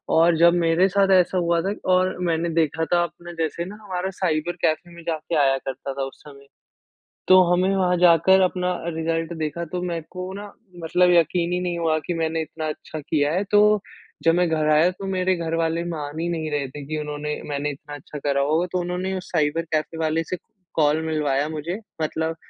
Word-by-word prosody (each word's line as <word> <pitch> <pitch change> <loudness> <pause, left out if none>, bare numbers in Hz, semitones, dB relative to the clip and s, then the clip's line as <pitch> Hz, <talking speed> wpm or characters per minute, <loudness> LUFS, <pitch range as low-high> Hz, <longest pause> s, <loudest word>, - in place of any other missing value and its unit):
और 165 +1 +5
जब 170 +1 +6
मेरे 170 +1 +3
साथ 195 +1 +2
ऐसा 185 0 +4
हुआ 170 -1 +2
था 195 +4 -1 0.2
और 185 0 +2
मैंने 165 0 0
देखा 160 -1 0
था 175 - +4
अपने 175 0 -8
जैसे 170 +2 -3
ना 195 +3 -8
हमारा 190 -2 -3
साइबर 175 -2 -1
कैफ़े 160 +2 0
में 170 - -11
जाके 160 0 -3
आया 135 -1 +3
करता 135 +1 -5
था 135 0 -3
उस 135 - -11
समय। 140 -2 -14 0.8
तो 185 0 +8
हमें 185 +2 +2
वहाँ 180 -1 +2
जाकर 175 +2 +5
अपना 180 0 +1 0.2
रिजल्ट 165 +1 -2
देखा 160 +2 -3
तो 180 -1 -2
मेरे 170 -2 -3
को 185 +1 -6
ना 205 +1 -8 0.3
मतलब 180 +2 +3
यक़ीन 170 +1 +2
ही 180 - 0
नहीं 175 -1 -2
हुआ 160 -2 +1
कि 175 - -1
मैंने 160 0 -1
इतना 155 0 -5
अच्छा 155 0 -6
किया 145 0 0
है, 185 +4 0
तो 210 +1 +4 0.4
जब 165 0 +5
मैं 175 0 +2
घर 155 -1 0
आया 155 +4 +5
तो 195 +2 -8
मेरे 185 -1 +1
घर 165 -1 -3
वाले 165 0 0
मान 155 -3 -5
ही 170 - -1
नहीं 160 -2 -2
रहे 145 -2 -1
थे 145 +2 -9
कि 155 +1 -3
उन्होंने 150 0 -4
मैंने 145 0 -2
इतना 145 +1 -9
अच्छा 145 +1 -9
करा 140 -1 0
होगा। 155 +5 +1
तो 180 - 0
उन्होंने 180 +2 -2
उस 180 - -10
साइबर 155 0 +1
कैफ़े 155 +1 -1
वाले 160 0 0
से 185 - -4 0.4
कॉल 155 0 +2
मिलवाया 150 -2 0
मुझे 160 +4 -4 0.2
मतलब 160 +1 -2
165 Hz, 210 wpm, -23 LUFS, 155-180 Hz, 0.8 s, तो